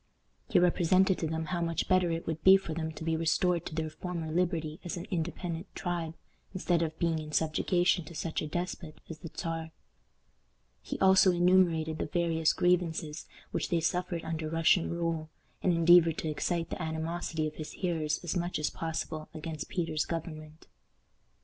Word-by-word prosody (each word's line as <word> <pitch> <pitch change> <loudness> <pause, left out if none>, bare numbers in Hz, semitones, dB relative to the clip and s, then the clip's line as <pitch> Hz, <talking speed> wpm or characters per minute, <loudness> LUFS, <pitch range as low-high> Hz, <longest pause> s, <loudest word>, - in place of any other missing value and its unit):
He - - +3
represented 180 +2 +4
to 160 - -1
them 160 +1 -2
how 170 +2 -2
much 165 -1 -1
better 185 -2 +3
it 165 0 -2
would 160 -1 -4
be 190 +1 +9
for 190 -4 -6
them 160 0 -3
to 160 - -8
be 165 0 0
restored 170 +1 +1
to - - -7
their 160 -1 -2
former 170 -2 -5
liberty 165 -2 -1
as 175 +1 -4
an 175 - -5
independent 170 0 -3
tribe, 170 -3 -3 0.4
instead 175 -2 +1
of 160 -1 -2
being 165 -2 +1
in 155 -1 -7
subjugation 175 +3 +2
to 170 - -11
such 160 +1 -2
a 155 - -3
despot 175 -1 -4
as 160 - -8
the 165 - -8
Czar. 165 -1 -3 1.1
He - - -5
also 190 0 +6
enumerated 175 -3 +3
the - - -1
various 165 -1 +2
grievances 165 -3 0 0.2
which - - -2
they 170 - +2
suffered 175 +1 -1
under 160 -1 -3
Russian 165 +2 +3
rule, 165 -2 -2 0.3
and 185 - +3
endeavored 170 -1 +6
to 160 - -2
excite 165 +2 -2
the - - -4
animosity 160 0 -2
of 155 0 -5
his 155 - -6
hearers 160 -5 -1
as 175 - -2
much 175 0 -1
as 150 - -1
possible 160 -1 -4
against 155 0 -5
Peter's 165 -4 -1
government. 155 -2 -6
165 Hz, 175 wpm, -30 LUFS, 160-175 Hz, 1.1 s, be